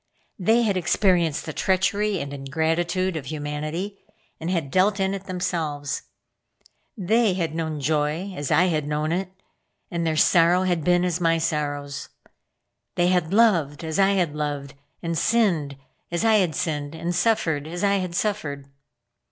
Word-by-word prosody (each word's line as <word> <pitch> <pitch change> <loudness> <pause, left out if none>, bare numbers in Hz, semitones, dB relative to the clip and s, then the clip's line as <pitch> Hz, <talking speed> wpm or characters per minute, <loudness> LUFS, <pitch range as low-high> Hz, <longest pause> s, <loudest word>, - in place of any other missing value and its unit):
They 225 +6 +3
had 200 -4 +1
experienced 175 -3 +2
the 155 - -5
treachery 195 +3 +1
and 140 0 -5
ingratitude 165 +6 -1
of 145 -4 -5
humanity, 155 +7 -4 0.4
and 165 - -4
had 165 -7 -1
dealt 200 +2 +3
in 190 0 +1
it 195 0 -6
themselves. 165 -6 -2 1.0
They 215 +1 +2
had 165 -4 -2
known 160 -2 -3
joy 155 +6 -1
as 145 -4 -4
I 180 - +4
had 155 -5 0
known 150 +1 -1
it, 185 +2 -2 0.6
and 170 -1 -1
their 160 -1 0
sorrow 175 +2 +4
had 175 -4 0
been 175 +2 +3
as 180 0 -1
my 165 -1 +3
sorrows. 145 -3 -3 0.9
They 175 0 +3
had 180 -3 +1
loved 180 -9 +3
as 160 +2 -2
I 195 0 +4
had 175 -6 +1
loved, 145 -2 -3 0.3
and 165 0 -2
sinned 165 -8 +1 0.3
as 170 +5 -1
I 220 -1 +5
had 180 -6 +1
sinned, 150 -2 -2
and 170 +2 -3
suffered 165 -6 +1
as 175 +3 -5
I 200 0 +3
had 180 -2 -3
suffered. 155 -10 -2
170 Hz, 160 wpm, -24 LUFS, 150-185 Hz, 1.0 s, I